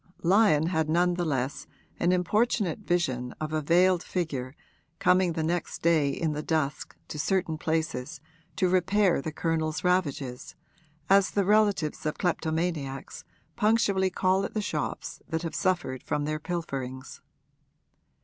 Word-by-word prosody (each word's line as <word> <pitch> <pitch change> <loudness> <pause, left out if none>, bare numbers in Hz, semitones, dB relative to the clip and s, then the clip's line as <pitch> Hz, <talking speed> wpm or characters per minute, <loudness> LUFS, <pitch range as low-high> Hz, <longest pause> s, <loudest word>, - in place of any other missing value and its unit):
Lyon 185 -4 +4
had 160 -3 0
none 175 +2 +3
the 175 0 -1
less 135 -3 -2 0.3
an 175 - +2
importunate 200 +1 +1
vision 135 -11 -1
of 155 0 -4
a 155 - +1
veiled 175 +3 +4
figure 145 -9 -3 0.4
coming 180 -1 +3
the 160 -1 -2
next 170 +1 -2
day 160 -4 +3
in 160 +2 -1
the 150 0 -3
dusk 155 -3 -2
to 150 - -6
certain 165 +1 0
places 160 -2 -2 0.4
to 190 -2 +2
repair 185 -1 +2
the 160 - -4
Colonel's 160 -1 -1
ravages, 145 -8 -1 0.5
as 195 0 +5
the 200 -2 0
relatives 205 -6 +2
of 150 - -2
kleptomaniacs 160 -5 -2 0.3
punctually 210 -3 +2
call 185 +1 +1
at - - -5
the - - +1
shops - - -4
that 160 0 -2
have 165 -2 -4
suffered 170 -8 -1
from 145 0 -2
their 155 0 -2
pilferings. 135 -7 -5
165 Hz, 140 wpm, -27 LUFS, 150-185 Hz, 0.5 s, as